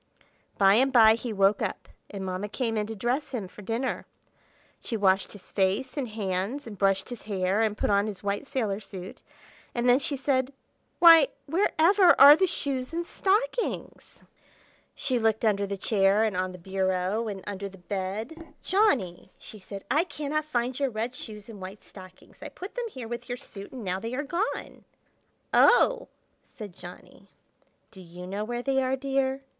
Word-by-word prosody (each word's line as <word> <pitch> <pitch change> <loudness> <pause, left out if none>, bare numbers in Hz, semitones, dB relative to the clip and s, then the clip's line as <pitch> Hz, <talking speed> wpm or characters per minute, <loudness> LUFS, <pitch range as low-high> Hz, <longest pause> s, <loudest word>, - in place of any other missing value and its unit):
By 195 -1 +6
and 260 +5 +4
by 225 -3 +7
he 230 +1 -4
woke 200 0 +2
up, - - -3 0.2
and 195 -2 -6
Mamma 185 +2 -4
came 230 0 -2
in 210 -1 -1
to 225 - -6
dress 245 +7 -1
him 215 -7 -3
for 210 - -13
dinner. 230 +6 -3 0.8
She 230 - -3
washed 195 -1 +2
his 205 -3 -11
face 195 +7 0
and 275 -4 -2
hands, 210 +4 -3
and 225 -3 -8
brushed 195 +1 +1
his 245 -2 -7
hair, 195 0 0
and 215 -1 0
put - - 0
on 200 +1 +2
his 205 -3 -7
white 200 +6 -2
sailor 220 -8 -2
suit; 190 -3 -10 0.5
and 240 +1 0
then 245 +2 +6
she 285 0 -2
said, 265 0 0 0.4
"Why, 330 -4 +8 0.2
where 340 +8 +1
ever 360 +2 +5
are 285 +2 +11
the 375 +4 +2
shoes 270 -3 -3
and 340 +1 -2
stockings?" 450 +7 -2 0.7
She 255 -2 0
looked 220 0 +1
under 200 -2 +1
the 200 0 -4
chair, 195 +1 +2
and 215 -4 0
on 185 0 -1
the 180 - -10
bureau, 190 +3 -1
and 195 -3 -6
under 200 -1 -5
the 195 - -15
bed. 205 - -6
"Johnny," 280 - +1
she 215 - -11
said, 195 +1 -9
"I 305 +4 +4
cannot 305 -2 -3
find 250 -3 -2
your 275 -1 +1
red 230 +2 -3
shoes 210 -4 -9
and 215 -4 -11
white 190 +3 -9
stockings. 185 -1 -15
I - - -7
put 370 +3 -9
them - - -3
here 255 - -8
with 240 +2 -7
your 245 - -3
suit, 200 -4 -11
and 255 -4 -8
now 185 -1 -2
they 230 +4 -5
are 285 - -2
gone." 345 +9 -3 0.7
"Oh!" - - +5 0.4
said 205 -6 -11
Johnny. 175 0 -13 0.6
"Do 190 - -13
you 175 0 -10
know 200 +3 -4
where 240 +2 -4
they 270 0 +1
are, 260 0 0
dear?" 270 0 -1
225 Hz, 185 wpm, -27 LUFS, 195-270 Hz, 0.8 s, are